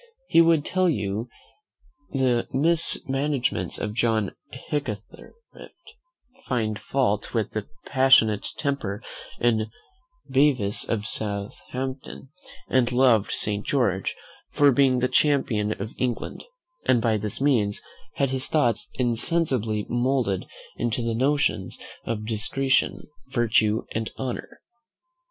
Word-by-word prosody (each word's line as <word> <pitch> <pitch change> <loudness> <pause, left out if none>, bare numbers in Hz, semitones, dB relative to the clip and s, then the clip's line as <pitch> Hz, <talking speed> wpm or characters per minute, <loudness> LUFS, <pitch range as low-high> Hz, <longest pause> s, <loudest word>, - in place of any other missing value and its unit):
He 165 - +5
would 165 -2 +3
tell 185 -1 +2
you 105 -3 -2 0.8
the 130 -3 +1
mis 160 +5 +2
managements 135 -1 -1
of 105 - -3
John 110 -3 +1 0.2
Hickathrift, 125 -8 -4 1.4
find 110 - -1
fault 120 -5 -1
with 110 -2 0
the 110 -2 -4 0.2
passionate 130 -6 +4
temper 120 -8 -2 0.4
in 110 -2 +1 0.6
Bevis 130 -7 +2
of 105 -3 -1
Southampton, 125 +7 -4 0.4
and 125 -2 +2
loved 120 -4 +3
Saint 105 -1 -1
George 105 -9 0 0.3
for 145 -1 +4
being 130 -1 +3
the 125 - +3
champion 125 -8 +1
of 105 +3 -5
England; 125 -2 -3 0.4
and 120 - +4
by 115 -1 +1
this 105 -1 -4
means 120 -8 +1 0.4
had 135 -2 0
his 130 -1 +3
thoughts 120 -8 +1
insensibly 120 -4 +2
moulded 120 -5 0 0.3
into 120 0 -1
the 115 0 -1
notions 130 -6 0 0.3
of 110 -2 -3
discretion, 115 +5 0 0.3
virtue, 110 -2 +2
and 110 0 -2
honour. 130 -2 -5
120 Hz, 110 wpm, -25 LUFS, 110-135 Hz, 1.4 s, He